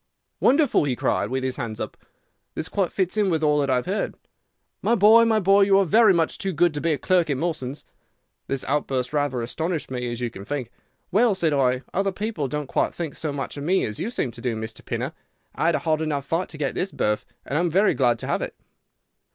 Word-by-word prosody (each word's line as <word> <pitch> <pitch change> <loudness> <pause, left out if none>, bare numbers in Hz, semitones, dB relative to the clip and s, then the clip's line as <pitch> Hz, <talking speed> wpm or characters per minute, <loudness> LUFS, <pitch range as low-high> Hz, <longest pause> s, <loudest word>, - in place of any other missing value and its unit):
"'Wonderful!' 280 - +3
he 130 -3 0
cried, 105 - 0
with 130 +1 -2
his 130 -1 -2
hands 110 -2 -4
up. - - -5 0.6
'This 160 - -4
quite 195 -2 0
fits 190 +1 -1
in 205 -2 +3
with 160 -3 0
all 150 -1 +3
that 140 -1 0
I 130 - +3
had 125 - -1
heard. 195 +3 -2 0.7
My 235 - +2
boy, 220 +2 +7
my 220 -1 +3
boy, 195 +1 +4
you 195 0 +5
are 195 - +4
very 215 +3 +5
much 165 -3 +1
too 195 -1 -1
good 170 +1 +3
to 145 - -3
be 165 - +1
a 150 - +1
clerk 180 -2 +2
at 140 - 0
Mawson's!' 145 -4 -3 0.6
"This 135 -1 -2
outburst 135 -2 -1
rather 145 -5 0
astonished 160 +5 -3
me, 125 -1 -3
as 120 - -5
you 120 -2 -2
can 100 - -9
think. 130 0 -4 0.4
'Well,' 215 +2 +4
said 165 -5 +1
I, 130 -2 +2
'other 195 +1 +1
people 205 -7 -3
don't 150 +2 -3
think - - -1 0.2
quite - - -15
so 155 - -3
much 140 0 -5
of 140 - -5
me 185 +5 +2
as 105 - -5
you 215 - -2
seem 150 - -2
to 115 - -11
do, 120 -2 -1
Mr. 110 0 -7
Pinner. 125 +6 -3 0.4
I - - 0
had 170 - +3
a - - +2
hard 160 -2 0
enough 145 -3 -2
fight 165 +5 -1
to 155 - -8
get 145 -3 -1
this 190 - -2
berth, 105 0 0 0.2
and 140 - -4
I - - +2
am 175 - +1
very 195 +6 +3
glad 120 -3 +2
to - - -5
have - - 0
it. - - -5
150 Hz, 245 wpm, -24 LUFS, 130-190 Hz, 0.7 s, boy